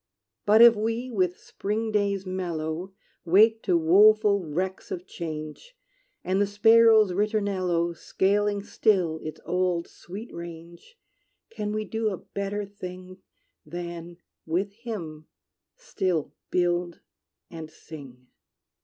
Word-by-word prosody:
But 215 +3 +7
if 235 -1 +9
we, 230 +4 -2
with 185 -5 0
spring 220 +2 -3
days 200 -2 0
mellow, 175 -1 -4 0.3
Wake 220 +6 +4
to 175 - +2
woeful 200 +4 +5
wrecks 185 +5 -4
of 180 0 -5
change, 160 - -7 0.5
And 190 +2 0
the 205 - +2
sparrow's 220 0 +5
ritornello 185 -4 0
Scaling 205 +3 0
still 180 -7 +1
its 155 - -7
old 180 -1 0
sweet 205 +7 -10
range; 170 - -10 0.5
Can 210 -2 -4
we 215 0 -2
do 220 +1 -1
a 190 - -4
better 200 +2 -4
thing 185 -2 -10 0.4
Than, 170 0 -7 0.3
with 190 +5 -1
him, 185 -10 -7 0.5
still 190 - -2 0.2
build 175 -1 0 0.5
and 160 -2 -8
sing? 135 -6 -12
190 Hz, 115 wpm, -26 LUFS, 170-210 Hz, 0.5 s, if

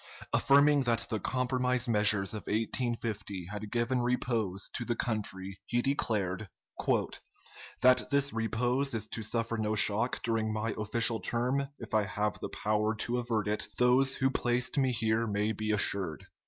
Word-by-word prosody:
Affirming 140 +1 +5
that 115 -1 +1
the 110 - 0
compromise 125 +1 0
measures 105 -3 +3
of 105 - -7
1850 110 -4 -2
had 105 0 -6
given 120 +1 0
repose 115 -6 -1
to 125 - -3
the 120 0 -1
country, 95 -5 -3
he 120 0 0
declared, 105 -7 -1 1.3
"That 130 0 +5
this 140 -1 +2
repose 120 +4 0
is 110 -1 -1
to 115 - -4
suffer 115 +1 -1
no 110 0 0
shock 110 +4 +2
during 115 -1 0
my 110 +1 -2
official 115 +2 +1
term, 125 +4 -1
if 115 - -10
I 110 -1 +3
have 105 +1 -2
the - - -5
power 105 +1 0
to 120 +2 -1
avert 115 -4 -1
it, 105 0 -1
those 130 +2 +4
who 135 0 +1
placed 120 -1 0
me 135 -3 +2
here 115 0 0
may 105 +1 0
be 110 0 -4
assured." 95 -6 0
115 Hz, 155 wpm, -30 LUFS, 105-125 Hz, 1.3 s, Affirming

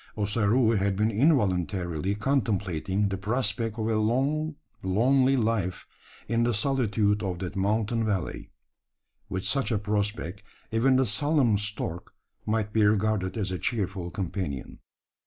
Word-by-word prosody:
Ossaroo 110 +3 +2
had 100 -2 +1
been 105 +3 +1
involuntarily 95 - +1
contemplating 100 - 0
the 95 -1 -3
prospect 110 +1 -1
of 110 -1 -1
a 110 -1 +1
long 140 +8 0 0.3
lonely 130 +8 +3
life 110 -6 -1 0.4
in 115 +1 +1
the 120 -1 +2
solitude 105 -4 +1
of 95 -4 -2
that 90 0 -5
mountain 110 +4 0
valley. 100 -6 -2 0.8
With 95 0 -3
such 135 -2 0
a 110 - +2
prospect 105 -2 -2 0.3
even 125 +4 +3
the 130 0 +4
solemn 125 -1 +2
stork 100 -4 -4 0.3
might 105 -1 0
be 110 - +3
regarded 105 -1 +1
as 100 -4 -2
a 90 - -3
cheerful 95 -4 -2
companion. 90 -7 -4
105 Hz, 135 wpm, -27 LUFS, 95-115 Hz, 0.8 s, the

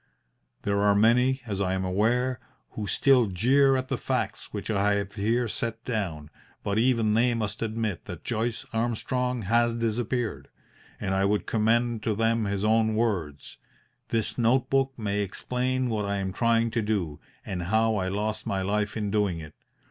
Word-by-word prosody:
There 100 0 +1
are 100 0 +4
many, 125 +5 +4
as 100 -3 -3
I 95 -1 0
am 95 0 -1
aware, 120 +6 +1 0.3
who 105 -2 -5
still 130 -2 +4
jeer 135 +8 +3
at 130 0 -3
the - - -2
facts - - -2
which - - -4
I 105 0 +2
have 100 0 -3
here 115 +4 0
set 115 +1 -4
down, 85 - -3 0.3
but 100 +1 0
even 115 -3 +2
they 120 +2 +3
must 105 -2 -3
admit 110 -4 -2
that - - -8
Joyce 115 +1 -2
Armstrong 120 +1 -1
has 115 +3 +2
disappeared, 115 - -2 0.5
and 95 - -2
I 95 +1 +2
would 105 +1 +1
commend 115 +1 +1
to 110 -1 -1
them 115 0 +1
his 100 0 -2
own 110 0 +3
words: 90 - -2 0.5
"This 115 +2 -1
note 120 +2 +2
book 135 0 +2
may 105 -2 -1
explain 125 +6 -1
what 110 -3 -1
I 100 0 -1
am 95 -1 -2
trying 115 +1 +2
to 115 - 0
do, 95 -9 -2 0.3
and 90 -2 -3
how 110 +3 +2
I 95 -1 -1
lost 105 +3 -2
my 95 -1 -1
life 105 +2 -1
in 105 -2 -2
doing 100 -5 +1
it. 75 -1 -10
110 Hz, 175 wpm, -27 LUFS, 100-120 Hz, 0.5 s, are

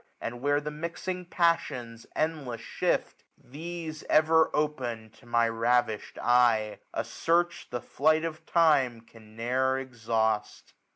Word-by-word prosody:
And 120 +1 -5
where 145 +1 +2
the 150 +1 -5
mixing 170 +4 -5
passions 140 -10 0
endless 150 -7 -2
shift; - - -2
These 160 +2 -7
ever 160 +1 +5
open 125 -7 -2
to 120 - -20
my 115 0 +3
ravish'd 115 -1 0
eyej 120 -3 +3
A - - -2
search, 175 +1 0
the 120 -1 -4
flight 155 +3 +2
of 160 0 -5
time 140 -8 +3
can 110 -1 -18
ne'er 130 +3 +1
exhaust. 115 -4 -2
130 Hz, 125 wpm, -28 LUFS, 115-155 Hz, -, ever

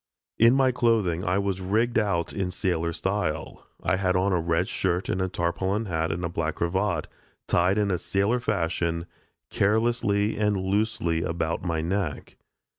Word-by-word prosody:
In 115 +3 +6
my 135 -1 +4
clothing 110 -8 +1
I 90 +2 +1
was 100 -1 -1
rigged 110 +6 +1
out 95 -6 0
in 95 -2 -2
sailor 85 -2 -1
style. 100 +5 -3 0.2
I 95 - +2
had 90 -1 +1
on 95 +1 +2
a 90 - +2
red 85 +2 0
shirt 90 0 -1
and 95 - 0
a 95 - 0
tarpaulin 95 +5 -1
hat 80 -3 -1
and 85 +2 -3
black 80 -1 -1
cravat, 95 +5 0 0.4
tied 90 +3 +2
in 100 -3 +2
sailor 100 +6 +1
fashion, 85 -5 -1 0.5
carelessly 105 -1 +1
and 105 -1 +2
loosely 95 -4 0
about 85 0 -2
my 85 -3 -1
neck. 85 -2 -3
95 Hz, 155 wpm, -26 LUFS, 85-105 Hz, 0.5 s, In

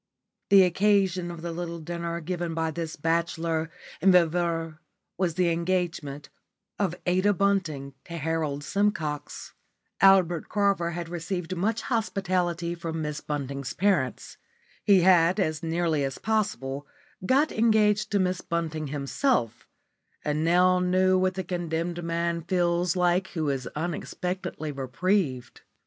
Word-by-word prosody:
The 195 -1 +8
occasion 185 -1 +2
of 170 -1 -8
the 170 - -3
little 170 0 -4
dinner 170 +1 -4
given 175 0 -3
by 160 -1 0
this 160 0 -4
bachelor 165 0 -1 0.3
and 190 +3 +6
viveur 165 -2 +1 0.4
was 175 -3 -1
the 180 -1 +2
engagement 170 -4 -2 0.5
of 190 -4 0
Ada 185 +3 +3
Bunting 170 -9 0
to 170 - -6
Harold 155 -2 -2
Simcox. 155 -6 -2 0.5
Albert 185 -4 +4
Carver 200 -4 +1
had 170 -1 -4
received 175 +1 -4
much 215 +5 -1
hospitality 180 -7 -1
from 165 -2 -4
Miss 150 0 -4
Bunting's 140 -2 -4
parents. 185 -10 0 0.5
He 200 -3 +5
had 175 +1 +5
as 155 -4 0
nearly 165 -2 0
as 135 -1 -3
possible 145 - -2 0.4
got 275 +9 +3
engaged 215 -2 +3
to 205 - +2
Miss 185 -1 0
Bunting 160 -2 -3
himself, 140 - -1 0.6
and 150 +1 0
now 180 +2 +4
knew 185 +1 +3
what 185 0 +1
the 190 - -3
condemned 175 -1 -3
man 170 0 -1
feels 175 0 +1
like 180 +1 +2
who 155 -4 -1
is 130 -2 -3
unexpectedly 175 0 -4
reprieved. 135 0 -1
170 Hz, 130 wpm, -27 LUFS, 160-185 Hz, 0.6 s, The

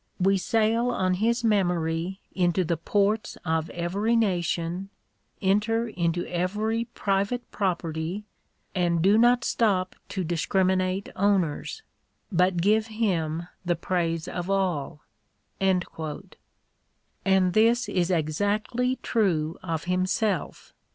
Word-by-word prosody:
We 195 +1 +3
sail 225 +5 +2
on 185 -6 +1
his 230 +5 +1
memory 180 -3 0
into 180 0 +2
the 170 0 0
ports 200 +6 0
of 160 -1 0
every 195 +7 0
nation, 180 -3 0 0.5
enter 220 +4 +2
into 170 -3 -1
every 210 +6 -1
private 215 +1 -1
property, 170 -1 -2 0.5
and 170 -3 +1
do 200 +3 +5
not 240 +2 +4
stop 195 -6 +1
to 190 - -2
discriminate 185 +3 0
owners, 195 - 0 0.5
but 180 0 +2
give 215 +5 +3
him 175 -7 -1 0.2
the 175 -1 +1
praise 165 -1 -1
of 175 +1 -4
all, 180 -7 -1 0.6
And 190 -2 +2 1.7
this 230 +3 +4
is 175 -1 0
exactly 205 +10 0
true 170 -8 0
of 165 -4 -3
himself. 185 +1 -1
185 Hz, 105 wpm, -26 LUFS, 170-215 Hz, 1.7 s, do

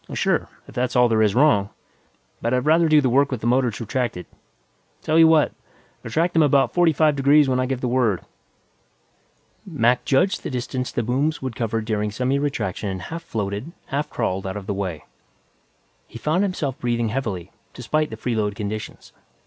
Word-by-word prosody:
"Oh, - - -6
sure, - - 0 0.2
if - - -13
that's 125 0 -1
all 125 0 +5
there 110 -2 +2
is 105 -2 +2
wrong. 120 -8 +4 0.7
But 120 +2 0
I'd 125 - -1
rather 160 +1 +4
do 155 -1 +6
the 135 - +1
work 140 +3 +3
with 125 -4 -3
the - - -5
motors 125 -2 +1
retracted. 115 -5 -3 0.8
Tell 155 +1 +2
you 165 - +8
what; 160 -2 +4 0.5
retract 170 +3 -1
them 165 - +4
about 135 -4 +3
forty 175 -2 +4
five 155 0 +2
degrees 140 +1 +4
when 130 -1 +1
I 130 - 0
give 130 -1 -3
the 125 - -1
word." 120 -6 +1 1.4
Mac 125 -8 +1
judged 180 +8 +1
the - - -5
distance 125 0 -3
the 120 - -1
booms 135 +6 -1
would 130 -3 -4
cover 115 -1 -1
during 105 -1 -1
semiretraction 125 -4 -2
and 95 -1 -4
half 165 +10 -6
floated, 110 +1 -4 0.2
half 145 +2 -2
crawled 95 +1 -2
out 95 +2 -4
of 100 - -8
the 100 - -2
way. 95 -6 -4 1.0
He - - -10
found 155 +9 0
himself 160 -9 -2
breathing 120 -2 -1
heavily, 105 -8 -4 0.2
despite 155 +5 -1
the 110 - -7
freeload 110 -3 -1
conditions. 105 +1 -6
125 Hz, 185 wpm, -22 LUFS, 110-145 Hz, 1.4 s, you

